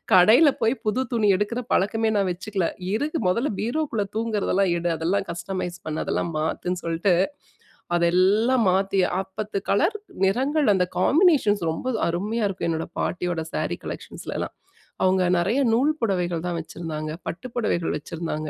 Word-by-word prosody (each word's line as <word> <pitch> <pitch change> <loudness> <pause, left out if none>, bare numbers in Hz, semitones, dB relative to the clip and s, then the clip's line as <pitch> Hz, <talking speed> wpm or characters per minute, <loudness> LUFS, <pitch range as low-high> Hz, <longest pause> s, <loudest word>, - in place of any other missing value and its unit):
கடையில 225 - +7
போயி 225 +3 +2
புது 250 +5 +1
துணி 215 -3 +3
எடுக்குற 220 +5 -1
பழக்கமே 220 +3 +1
நா 200 - +3
வச்சுக்கல. 190 0 -2 0.3
இருக்கு, 300 +8 -1
"மொதல்ல 235 +9 0
பீரோக்குள்ள 235 -3 -1
தூங்குறதெல்லாம் 205 -4 +1
எடு. 170 0 0
அதெல்லாம் 190 +5 0
கஸ்டமைஸ் 175 +1 -5
பண்ணு, 155 0 -2
அதெல்லாம் 170 - -1
மாத்துன்னு" 175 +3 -2
சொல்ட்டு, 170 +3 +2 0.8
அதெல்லாம் 190 +9 +3
மாத்தி, 195 +1 +1 0.2
ஆ - - +1 0.2
பத்து 210 -1 -2
கலர் 335 - +2 0.3
நிறங்கள் 270 +10 +2
அந்த 185 -2 +2
காம்பினேஷன்ஸ் 270 - +4
ரொம்ப 165 +10 -5 0.2
அருமையா 205 +7 -1
இருக்கும் 195 -3 -3
என்னோட 160 0 -1
பாட்டியோட 175 -1 -1
ஸேரி - - -1
கலெக்ஷன்ஸ்லலாம். - - -6 0.5
அவங்க 185 0 +3
நெறைய 200 +10 +1
நூல் 275 +7 +3
புடவைகள் 180 -6 0
தான் 175 -1 -2
வச்சிருந்தாங்க, 155 -2 -5
பட்டு 250 +9 -5
புடவைகள் 215 -8 0
வச்சிருந்தாங்க. 155 0 -5
195 Hz, 140 wpm, -24 LUFS, 175-230 Hz, 0.8 s, கடையில